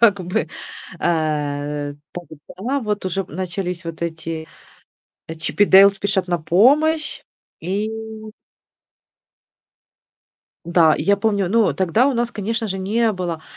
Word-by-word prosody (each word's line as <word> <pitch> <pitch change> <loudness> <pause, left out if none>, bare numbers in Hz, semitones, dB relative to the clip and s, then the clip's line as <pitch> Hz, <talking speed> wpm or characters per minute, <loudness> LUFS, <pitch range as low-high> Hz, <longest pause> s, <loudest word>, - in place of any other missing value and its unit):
как 205 -5 +5
бы. 170 -3 -1 0.5
Э, 145 -3 -1 0.5
тогда 255 +9 -3
вот, 210 -3 -3
уже, 195 +1 -1
э, - - -13
начались 180 +1 -4
вот 165 0 -6
эти, 160 -1 -4 0.8
э, 160 - -6
"Чип 160 +5 -3
и - - +8
Дейл 195 +1 +8
спешат 195 -1 -2
на 175 -1 0
помощь". 285 - +2 0.4
И 195 +6 -2 2.8
М-да, 170 -2 +4
и - - -3
я 200 +5 +3
помню, 200 -2 0
ну, 220 +1 +3
тогда 190 +7 +2
у - - +1
нас, 235 0 0
конечно 225 +1 -3
же, 190 0 -3
не 220 +4 +1
было 175 -4 -4
190 Hz, 135 wpm, -20 LUFS, 165-210 Hz, 2.8 s, и